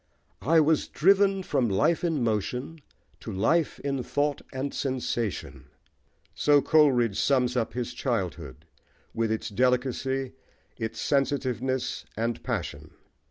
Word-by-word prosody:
"I 160 - +4
was 155 0 +2
driven 195 +2 +3
from 125 -9 0
life 130 - +2
in 160 -7 0
motion 125 +8 -2 0.4
to 110 - -7
life 145 - +1
in 140 -2 -2
thought 145 +3 -1
and 135 +1 -3
sensation:" 110 - -3 0.7
so 145 -1 +4
Coleridge 130 -9 +3
sums 125 -3 +2
up 120 -3 -1
his 125 -1 -3
childhood, 105 - -3 0.5
with 115 -1 0
its 110 - -2
delicacy, 130 +3 0 0.4
its 110 0 -5
sensitiveness, 130 -2 -1
and 115 +1 -2
passion. - - -5
130 Hz, 115 wpm, -27 LUFS, 115-145 Hz, 0.7 s, I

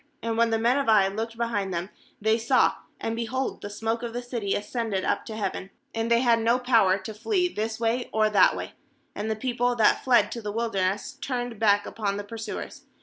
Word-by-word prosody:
20And 230 0 -1
when 230 0 +3
the 225 - +1
men 240 +5 +2
of 275 - 0
Ai 205 -3 +6
looked 225 +3 -4
behind 220 -5 -1
them, 175 +2 -3 0.3
they 220 +1 +3
saw, 235 +3 +3 0.3
and, 225 - -2
behold, 245 +3 -3
the 205 - -6
smoke 225 +3 -2
of 235 -1 -5
the 245 +1 -4
city 235 -5 -2
ascended 210 -2 -2
up - - 0
to 220 - -6
heaven, 195 -2 -3 0.2
and 225 0 -1
they 235 0 +4
had 235 -2 +4
no 230 +2 +3
power 230 -7 +3
to 220 +2 -7
flee 360 - +1
this 220 +1 -3
way 235 +2 0
or 220 0 +3
that 205 -3 +5
way; - - -6 0.4
and 210 +2 -4
the 220 - 0
people 245 +1 0
that 220 -2 +3
fled 250 -2 +4
to 235 - -5
the 210 -1 -4
wilderness 210 +3 -1
turned 245 -4 -3
back 205 -2 +3
upon 200 -2 -2
the 205 - -4
pursuers. 220 +1 -7
225 Hz, 215 wpm, -26 LUFS, 210-235 Hz, 0.4 s, Ai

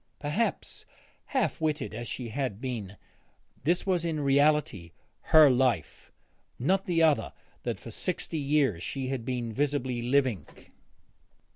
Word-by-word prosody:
Perhaps, 155 +11 -2 0.4
half 260 -10 -1
witted 150 -5 -1
as 120 +2 -5
she 120 -2 -5
had 125 -4 -3
been, 115 -7 -5 0.7
this 175 +5 +1
was 180 -3 +1
in 165 -2 -1
reality 140 - +2 0.4
her 155 -1 +10
life, 125 - 0 0.5
not 190 +9 +1
the 165 -2 +2
other 155 -3 +2 0.3
that - - -3
for - - -10
sixty 160 - -3
years 140 - +1
she 130 +6 -4
had 130 -3 -3
been 120 -2 -3
visibly 130 -2 -1
living. 125 - +1
135 Hz, 130 wpm, -28 LUFS, 120-155 Hz, 0.7 s, her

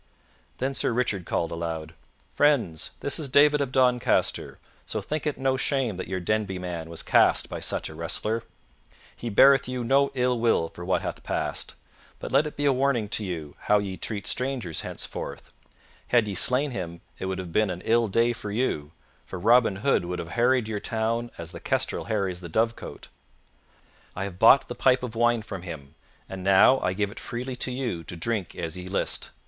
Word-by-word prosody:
Then 135 +2 -1
Sir 125 - 0
Richard 105 -7 -1
called 85 - -1
aloud, 80 -1 -4 0.4
"Friends, 130 - +2
this 140 - 0
is 150 -3 -4
David 145 +2 +5
of 135 -2 -1
Doncaster; 125 -2 +2 0.3
so - - -3
think 155 0 -3
it 150 - -1
no 130 0 +1
shame 130 -7 0
that 95 - -5
your 95 0 -2
Denby 100 +1 -1
man 85 -3 -5
was 85 - -5
cast - - +3
by - - -5
such - - -1
a - - -9
wrestler. 85 +8 -2 0.7
He 120 - -5
beareth 135 +6 +6
you 125 -1 -3
no 135 +3 +3
ill 125 -1 +1
will 115 -8 +2
for 85 - -10
what 95 +1 0
hath - - -4
passed, - - -3 0.4
but - - -7
let 140 +3 +4
it 150 - -9
be 145 - -1
a 140 - +4
warning 130 -5 +1
to 110 - -1
you 80 -7 -5
how 105 - +5
ye 100 -2 -3
treat 100 +1 -3
strangers 125 - -1
henceforth. - - -7 0.6
Had 120 -3 +3
ye 100 - -3
slain 130 +8 +3
him 85 -6 -5 0.2
it 95 - -3
would 95 0 -2
have 90 -3 -6
been 110 -1 +3
an 90 -1 -4
ill 115 0 +3
day 115 +4 +2
for 105 - -7
you, 100 - -1 0.4
for 95 - -6
Robin 115 +2 +4
Hood 135 -10 +3
would 90 0 -3
have 85 - -6
harried 120 +2 +2
your 110 -2 -3
town 115 +2 -1
as 85 0 -6
the 85 - -8
kestrel - - -1
harries 95 -5 -2
the 85 - -8
dovecote. 115 +6 -2 1.1
I 95 - -3
have 95 -2 -6
bought 115 +5 +7
the - - -5
pipe 130 -1 +3
of 125 -3 -4
wine 120 -1 +2
from 95 -3 -7
him, 80 -5 -8 0.3
and 95 -1 -7
now 100 +7 +6
I 90 - 0
give 100 +1 -1
it - - -10
freely 125 +2 -5
to 125 - -1
you 125 -10 -3
to - - -7
drink 100 +1 -2
as 80 -1 -4
ye 90 0 -7
list. 95 - -2
110 Hz, 200 wpm, -26 LUFS, 90-125 Hz, 1.1 s, bought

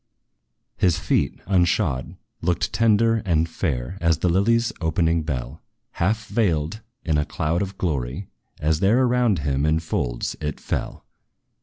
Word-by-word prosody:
His 90 -2 +3
feet, - - 0
unshod, 85 -7 +1 0.3
looked 90 0 0
tender 115 0 +3
and 85 -4 +1
fair, 80 0 -3
As 85 -2 +3
the 90 - +1
lily's 115 +6 +2
opening 80 0 +1
bell, 70 -2 -4 0.3
Half 110 +5 0
veiled 90 -3 0 0.2
in 80 -3 +2
a - - +2
cloud 80 +3 -1
of 100 0 -4
glory, 75 +1 -2 0.3
as 75 +1 +1
there 110 +7 +4
Around 120 -6 +2
him, 70 -1 0
in 80 +1 +2
folds, - - -2
it 75 0 -3
fell. - - -4
85 Hz, 140 wpm, -23 LUFS, 75-100 Hz, 0.3 s, there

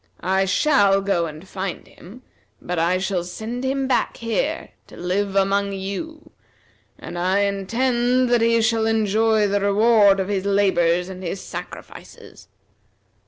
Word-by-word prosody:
I 190 +1 +1
shall 200 -1 +3
go 185 -4 0
and 155 +4 -11
find 190 -1 -5
him, 220 +9 -15 0.4
but 180 -1 -4
I 170 +2 +2
shall 185 -1 -2
send 220 +8 -6
him 270 0 -1
back 260 - 0
here 230 - -2 0.2
to - - -14
live 195 +3 -2
among 200 +1 +1
you, 200 +12 -6 0.7
and 175 - -7
I 185 +3 +1
intend 240 +5 0
that 240 -1 +3
he 230 0 +3
shall 225 0 +1
enjoy 220 0 +2
the 200 0 0
reward 205 0 +4
of 190 - -1
his 200 -2 -2
labor 200 -2 +2
and 180 +2 -2
his 185 +1 -4
sacrifices. - - -10
200 Hz, 145 wpm, -21 LUFS, 190-230 Hz, 0.7 s, reward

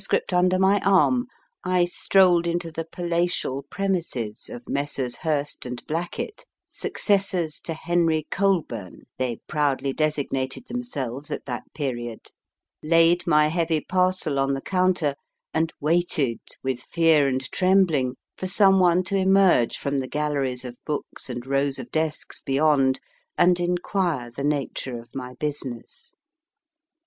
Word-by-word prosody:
under 180 +1 +3
my 190 +2 +4
arm, 200 +7 +3 0.4
I 180 -1 +2
strolled 175 -1 +3
into 170 -1 -2
the 165 +1 -5
palatial 170 -6 -1
premises 170 - -2
of 120 0 -9
Messrs. 140 -3 -2
Hurst 150 -3 -2
& - - -12
Blackett 175 - -4
( - - -65
successors 195 - 0
to 165 - -3
Henry 165 -2 +1
Colburn 165 - -1 0.2
they 125 -3 -2
proudly 140 -2 0
designated 145 - -1
themselves 150 - -4
at - - -5
that - - -6
period), 120 -6 -4 0.5
laid 165 +2 +4
my 150 -2 +5
heavy 165 -1 +1
parcel 185 -4 0
on 135 0 +1
the 135 - -5
counter, 180 -5 +1 0.4
and 160 0 +1
waited, 150 -6 +1 0.2
with 130 -2 -1
fear 160 -3 +3
and 130 0 -2
trembling, 180 -9 +3 0.2
for 185 - -4
some 195 0 +5
one 180 0 +4
to 195 - -2
emerge 190 -9 +4
from 140 0 -1
the 130 - -3
galleries 140 -4 -1
of 120 -1 -8
books 150 -2 -4
and 120 0 -5
rows 140 0 0
of - - -8
desks 155 -1 -1
beyond, 135 -1 +2 0.4
and 180 0 +4
inquire 175 - -1
the 140 +4 -6
nature 140 -4 -2
of 115 - -15
my 125 -1 -6
business. 145 - -5
155 Hz, 135 wpm, -24 LUFS, 135-180 Hz, 0.5 s, my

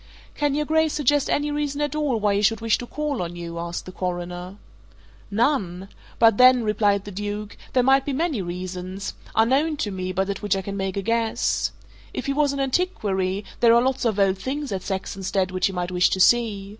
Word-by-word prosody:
"Can 290 -1 0
your 300 0 0
Grace 315 0 +2
suggest 290 -1 +2
any 295 +1 0
reason 290 -1 -2
at 295 0 -1
all 290 -6 0
why 205 -1 +2
he 200 - +1
should 220 +2 +2
wish 225 -1 +1
to 245 - -6
call 295 -4 -3
on 175 0 -4
you?" 170 -1 -6
asked 170 0 -5
the 185 - -8
Coroner. 180 0 -4 0.7
"None! 200 -5 0 0.3
But 225 -3 +5
then," 255 -1 +7
replied 205 -2 +1
the 205 - -7
Duke, 205 +1 -5 0.2
"there 255 - +4
might 270 +1 +4
be 285 - -3
many 290 - -1
reasons 185 +2 -5 0.2
unknown 275 +8 +2
to 210 -8 -2
me, 185 -1 -3
but 190 +1 -1
at 200 - -4
which 205 -2 +1
I 190 - -3
can 200 +1 -5
make 195 -1 -3
a 200 - -2
guess. 230 +1 0 0.4
If - - -3
he 275 - 0
was 290 0 +2
an 280 - -4
antiquary, 210 - -1
there 235 -1 +6
are 235 - +5
lots 265 +1 0
of 225 -4 +1
old 195 -1 +2
things 280 +4 -4
at 190 -1 -2
Saxonsteade 190 -1 -2
which 185 0 +1
he - - -3
might 180 -1 -3
wish 180 0 +3
to 190 - -1
see. 205 -2 +3
210 Hz, 215 wpm, -24 LUFS, 190-270 Hz, 0.7 s, then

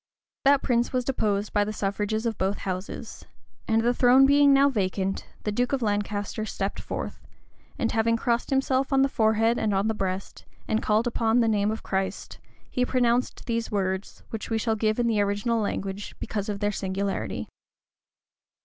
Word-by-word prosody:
That 280 0 +5
prince 240 -2 +1
was 250 -1 0
deposed 210 -5 -1
by 205 - +3
the 210 - -3
suffrages 210 +2 -2
of 225 -2 -2
both 195 +2 0
houses; 185 0 -6 0.4
and 225 0 +2
the 240 +1 +3
throne 255 +2 +6
being 285 +1 +6
now 275 +1 +6
vacant, 195 -5 -1 0.2
the 210 - -1
duke 245 +5 0
of 265 -3 0
Lancaster 205 0 -1
stepped 200 -2 -3
forth, - - -5 0.6
and 230 - 0
having 230 +1 +2
crossed 235 0 0
himself 270 0 +1
on 270 0 +4
the - - +4
forehead 225 -1 +2
and 210 -2 0
on 195 +2 +1
the 220 - +1
breast, 190 -2 -4 0.2
and 220 - +1
called 215 +2 +2
upon 230 -1 +2
the 230 - +3
name 210 -2 +2
of 220 +1 -4
Christ,[*] 190 -1 -3 0.3
he 250 - -1
pronounced 250 -1 +1
these 230 -1 -1
words, 190 -1 -2
which 225 - -5
we 225 - +1
shall 220 0 0
give 215 0 0
in 240 - +1
the 220 -3 +2
original 205 +3 0
language, 200 0 -4
because 205 -1 -3
of 200 0 -4
their 205 0 +1
singularity. 195 0 -3
220 Hz, 180 wpm, -26 LUFS, 205-240 Hz, 0.6 s, throne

